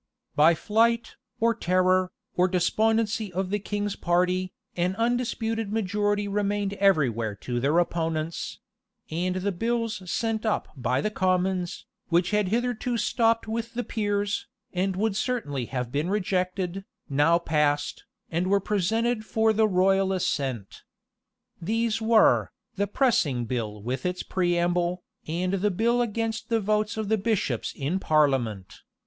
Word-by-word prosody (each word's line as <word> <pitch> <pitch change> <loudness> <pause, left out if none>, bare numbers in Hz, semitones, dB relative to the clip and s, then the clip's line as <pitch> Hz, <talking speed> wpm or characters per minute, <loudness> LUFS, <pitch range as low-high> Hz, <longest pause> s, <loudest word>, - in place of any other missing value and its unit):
By 155 +3 +6
the 160 - -7
flight, 230 +2 +1 0.2
or 230 +1 +3
terror, 185 -2 +2 0.2
or 180 +1 +4
despondency 215 +3 +1
of 185 +1 -2
the 205 - +1
king's 205 0 -3
party, 180 +1 +1 0.2
an 180 +2 0
undisputed 225 -2 -1
majority 205 -1 0
remained 205 0 -1
everywhere 135 - +2
to 120 -1 -2
their 140 +6 +2
opponents; 165 -2 -1 0.5
and 180 +3 -1
the 190 +2 -1
bills 230 +2 -1
sent 225 -1 -1
up 220 -2 -1
by 125 0 0
the 215 - -1
commons, 185 -2 0 0.2
which 175 +2 +2
had 210 -2 +2
hitherto 240 +2 -1
stopped 230 +1 +1
with 230 +1 -4
the 245 - -1
peers, 205 -2 -1 0.3
and 190 +1 0
would 210 +1 0
certainly 205 - -2
have 125 -1 -4
been 150 +6 -1
rejected, 185 -1 -1 0.2
now 145 +4 +3
passed, 150 -3 0 0.3
and 170 +3 0
were 200 +1 +3
presented 215 +4 0
for 220 0 +2
the 220 0 +3
royal 195 0 +3
assent. 135 - -2 0.8
These 225 +4 0
were, 220 0 +4 0.2
the 200 +1 -1
pressing 170 - +1
bill 110 -4 -4
with 125 +3 -3
its 180 0 -3
preamble, 175 0 0 0.2
and 180 +4 -1
the 195 +2 +1
bill 235 +5 +1
against 225 0 -2
the 230 -1 +2
votes 210 +1 0
of 220 -1 -2
the 220 +1 +1
bishops 195 - -1
in 150 +7 -1
parliament. 135 - +1
190 Hz, 140 wpm, -26 LUFS, 170-220 Hz, 0.8 s, By